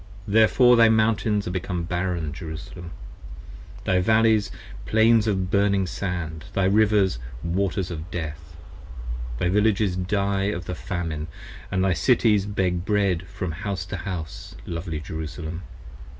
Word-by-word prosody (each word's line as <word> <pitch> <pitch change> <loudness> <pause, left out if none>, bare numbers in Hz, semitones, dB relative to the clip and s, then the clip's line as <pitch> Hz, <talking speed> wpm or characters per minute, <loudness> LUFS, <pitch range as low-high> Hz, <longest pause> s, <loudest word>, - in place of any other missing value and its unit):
25 100 - -5
Therefore 120 +3 +6
thy 115 -1 +6
Mountains 110 -2 +2
are - - -2
become 90 -1 -2
barren, 85 -3 -2
Jerusalem: 80 +2 -7 1.0
Thy 95 -1 +3
Valleys, 110 0 +3 0.4
Plains 110 0 +4
of 95 -3 0
burning 100 -1 +3
sand, 85 -3 -4
thy 95 -1 +2
Rivers, 100 - +3 0.2
waters 95 +1 -1
of 80 +1 -6
death. 80 -1 -6 0.8
Thy 90 - 0
Villages 105 0 +2
die 100 +1 0
of 100 -3 -2
the 90 - -4
Famine, 80 -4 -4 0.4
and 95 0 0
thy 95 -1 +3
Cities 105 - +3
Beg 90 -4 0
bread 95 -4 +1
from 95 -2 -4
house 95 0 -4
to 100 +1 -5
house, 85 -4 -6
lovely 80 -2 -4
Jerusalem. 80 +2 -6
95 Hz, 135 wpm, -24 LUFS, 85-105 Hz, 1.0 s, Therefore